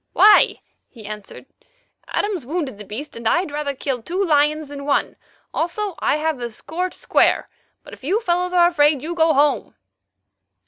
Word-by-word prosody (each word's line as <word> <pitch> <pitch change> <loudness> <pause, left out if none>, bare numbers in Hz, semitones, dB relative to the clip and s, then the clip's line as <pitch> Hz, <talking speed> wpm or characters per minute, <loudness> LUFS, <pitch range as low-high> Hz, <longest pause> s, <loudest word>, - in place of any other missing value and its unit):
"Why?" 420 0 +6 0.3
he 225 -4 -14
answered, 210 +3 -9 0.6
"Adams 400 -8 -2
wounded 280 - -4
the - - -7
beast, 245 +10 -8
and 230 -1 -4
I'd 345 +5 +1
rather 290 -1 -3
kill 260 -2 -3
two 365 - -1
lions 300 -1 +2
than 285 -1 -7
one; 285 - +1 0.4
also 390 +4 -2
I - - +1
have 310 -3 -1
a 240 -1 -4
score 340 +10 -4
to - - -16
square. - - +2 0.3
But - - -13
if - - -13
you 375 +10 +1
fellows 360 -4 0
are 350 -1 +5
afraid, 295 -5 +2
you 335 +2 -3
go 325 -1 +3
home." 285 0 +1
300 Hz, 175 wpm, -21 LUFS, 275-350 Hz, 0.6 s, Why